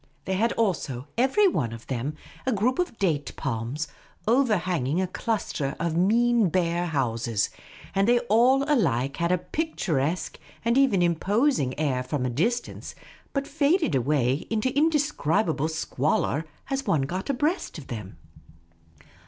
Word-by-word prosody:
They 190 - -1
had 225 +5 +2
also 155 - -1
every 265 - +4
one 120 - 0
of 115 0 -9
them 135 +4 -3 0.3
a - - +3
group 245 - +1
of 355 -10 -1
date 155 -8 0
palms, 135 +5 -3 0.4
overhanging 185 - +2
a 190 - +2
cluster 180 - -2
of 165 -1 -1
mean 225 +3 +3
bare 175 0 0
houses; 115 -7 0 0.4
and 195 +1 +2
they 240 +1 +5
all 245 +4 +4
alike 140 - +1
had 170 +1 +1
a 180 - +4
picturesque 180 - -2 0.3
and 235 +1 +3
even 255 -10 +4
im 170 -1 +3
posing 200 - +1
air 135 -5 +1
from 130 +1 -2
a 125 - -1
distance, 230 - -2 0.4
but 275 -1 -1
faded 300 - +1
away 135 +1 +1
into 225 +4 0
indescribable 275 - +1
squalor 155 -1 0 0.3
as 270 0 -2
one 150 -4 +2
got 185 - -4
abreast 295 - -1
of 150 - -9
them. 105 -6 -7
180 Hz, 145 wpm, -26 LUFS, -, 0.4 s, they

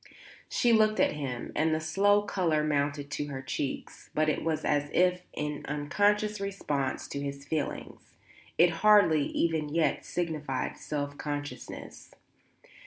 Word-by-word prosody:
She 240 -1 +3
looked 215 -1 +4
at - - +4
him 135 -5 -4
and 155 +1 +2
the - - -1
slow 200 +6 +3
colour 170 -7 +1
mounted 145 -1 -1
to 145 - -2
her 135 -2 -6
cheeks; 135 +1 -4
but 155 0 +3
it 150 - -1
was 160 -1 -1
as 145 0 +1
if 180 0 +3
in 150 -1 -4
unconscious 205 +8 +1
response 150 -9 -2
to 140 - -4
his 140 0 -5
feeling; 150 0 -3 0.6
it 170 +1 +6
hardly, 200 -8 +6
even 160 -3 0
yet, 160 +2 +1
signified 150 -7 -2
self 145 -1 -4
consciousness. 145 -1 -6
155 Hz, 140 wpm, -29 LUFS, 145-180 Hz, 0.6 s, it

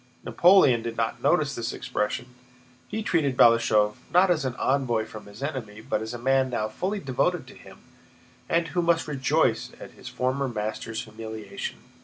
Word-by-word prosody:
Napoleon 170 -10 +5
did 115 0 -5
not 115 0 -1
notice 150 -5 +2
this 115 +1 -3
expression; 125 0 -3 0.5
he 215 +1 -4
treated 145 -9 +1
Balashëv 110 -4 +4
not 180 +1 +5
as 155 -5 +1
an 125 -2 -2
envoy 125 -5 0
from 110 -2 -11
his 100 +6 -10
enemy, 120 -8 -5
but 110 -1 -2
as 110 0 -5
a 120 - -5
man 130 +2 +2
now 110 -3 -1
fully 195 - -3
devoted 130 -7 -1
to - - -13
him - - -15 0.7
and 165 0 +1
who 180 - 0
must 170 -1 +1
rejoice 135 -3 +1
at - - -10
his - - -13
former 130 +2 -1
master's 110 0 -4
humiliation. 110 0 -7
125 Hz, 170 wpm, -26 LUFS, 110-150 Hz, 0.7 s, Napoleon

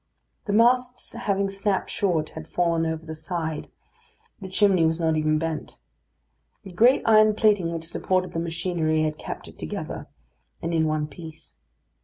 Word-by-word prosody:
The 205 - -1
masts 245 +3 +2
having 200 -4 0
snapped 195 0 -1
short, 170 -6 0
had 160 0 -9
fallen 165 -1 +1
over 160 0 -4
the 160 - -6
side; 160 -1 -4 0.7
the 190 -2 -7
chimney 190 -2 +3
was 160 +1 +1
not 160 -1 +2
even 155 0 +2
bent. 160 0 -4 0.9
The 195 - -10
great 235 +9 +4
iron 215 -1 +6
plating 205 -6 +3
which 165 -1 -4
supported 185 +2 -1
the 165 - -1
machinery 165 -2 0
had 155 0 -2
kept - - -7
it - - -14
together, - - -5 0.5
and 165 +1 -3
in 160 -1 +2
one 155 -1 0
piece. 160 - -11
170 Hz, 160 wpm, -25 LUFS, 160-200 Hz, 0.9 s, iron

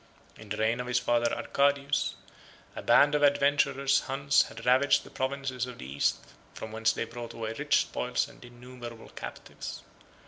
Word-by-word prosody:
In 110 - -13
the 105 - -3
reign 110 +2 +1
of 125 - -4
his 125 0 +1
father 120 -1 +2
Arcadius, 140 0 +1 0.6
a - - -5
band 145 - +5
of 150 - +2
adventurous 140 -1 +3
Huns 140 +1 +2
had - - -10
ravaged 130 +3 +4
the - - -14
provinces 130 -2 -2
of 125 -2 -9
the - - -9
East; 70 +2 0 0.4
from 110 - -7
whence 110 +1 +2
they - - -3
brought 115 +1 -8
away 110 -1 -4
rich 145 +5 +2
spoils 125 +3 -1
and 140 -1 -16
innumerable 120 -1 -10
captives. - - -8
125 Hz, 170 wpm, -29 LUFS, 115-140 Hz, 0.6 s, band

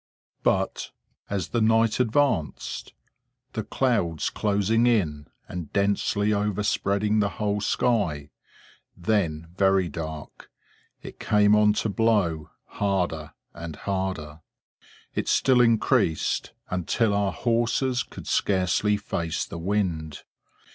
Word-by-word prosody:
But, - - 0 0.4
as 95 -4 -2
the 120 - 0
night 115 +1 +3
advanced, 125 - 0 0.6
the 110 - -3
clouds 105 - 0
closing 105 +3 +1
in 80 -11 +1 0.2
and 85 -4 -6
densely 100 +1 +1
overspreading 105 0 0
the 105 -1 +2
whole 105 -1 -1
sky, 90 -11 0 0.7
then 85 -5 -1
very 95 -2 +3
dark, 80 -2 -7 0.5
it - - -10
came 105 0 +4
on 105 0 +5
to 110 - -1
blow, 100 -8 +1 0.2
harder 90 -6 -2 0.2
and 85 -2 -7
harder. 95 -6 -4 0.7
It - - -2
still 130 -2 +4
increased, 115 -8 +2 0.2
until 95 +5 +1
our 100 -1 +1
horses 120 +3 0
could - - -9
scarcely 100 +2 +1
face 85 -5 -3
the 85 - -7
wind. 85 -5 -2
100 Hz, 105 wpm, -25 LUFS, 85-110 Hz, 0.7 s, on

